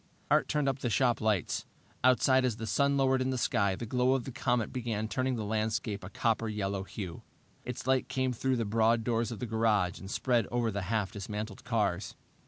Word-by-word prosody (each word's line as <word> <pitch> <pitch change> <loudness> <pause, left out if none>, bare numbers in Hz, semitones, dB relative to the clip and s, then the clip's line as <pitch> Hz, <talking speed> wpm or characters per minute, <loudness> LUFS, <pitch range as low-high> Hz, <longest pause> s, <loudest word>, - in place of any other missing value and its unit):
Art - - +4
turned 150 -2 0
up 135 -1 0
the 120 - -1
shop 120 0 +2
lights. 110 -5 0 0.4
Outside, 130 +1 +5
as 125 -4 +1
the 115 - -4
sun 140 +5 +2
lowered 130 -1 +3
in 130 - 0
the 130 - -1
sky, 100 -6 +1
the 120 - -5
glow 125 +3 +2
of 130 - -1
the 135 - -6
comet 120 -2 0
began 115 -4 -2
turning 130 +5 0
the 110 -3 -3
landscape 110 -1 -1
a 90 - -7
copper 115 +2 0
yellow 100 -2 -2
hue. 95 -3 -6 0.4
Its 125 -2 -5
light 130 0 +2
came 130 -1 0
through 130 +2 0
the 115 -2 -1
broad 115 +2 +2
doors 115 0 0
of 115 - -5
the 125 - -4
garage 110 -5 +1
and 95 - -9
spread 120 0 +1
over 120 -2 0
the 100 0 -2
half 105 -3 0
dismantled 105 0 -5
cars. 105 -6 -1
115 Hz, 210 wpm, -31 LUFS, 105-125 Hz, 0.4 s, Outside